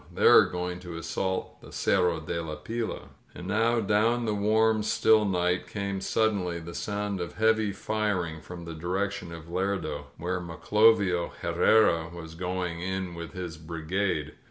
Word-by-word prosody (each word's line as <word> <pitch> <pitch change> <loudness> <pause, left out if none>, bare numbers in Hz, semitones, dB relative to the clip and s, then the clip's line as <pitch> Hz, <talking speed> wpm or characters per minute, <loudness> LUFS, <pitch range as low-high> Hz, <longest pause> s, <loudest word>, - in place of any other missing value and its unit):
They - - 0
are - - +9
going 90 0 -4
to 90 -2 -8
assault 95 +3 -3
the - - -13
Cerro 90 -3 +2
de 85 +2 -3
la 80 -2 -5
Pila. 115 +6 -3
• - - -8
• - - -14
•" - - -16 0.3
And 90 - -8
now 115 +4 +2
down 115 +3 +2
the 110 - 0
warm, 110 +1 +3
still 110 0 +4
night 90 -2 0
came 100 -2 -3
suddenly 95 -6 0
the 85 +1 -8
soimd 100 +1 -3
of 85 -1 -4
heavy 110 -1 +2
firing 95 -6 -2
from 85 0 -9
the 85 - -6
direction 90 +2 -3
of 85 -1 -8
Lerdo, 95 +3 -2
where 90 +2 -2
Maclovio 95 +1 +2
Herrera 85 -7 +3
was 80 -2 -9
going 90 -1 -3
in 95 -1 -3
with 85 -1 -7
his 90 -3 -6
brigade. 80 0 -2
90 Hz, 170 wpm, -28 LUFS, 85-105 Hz, 0.3 s, are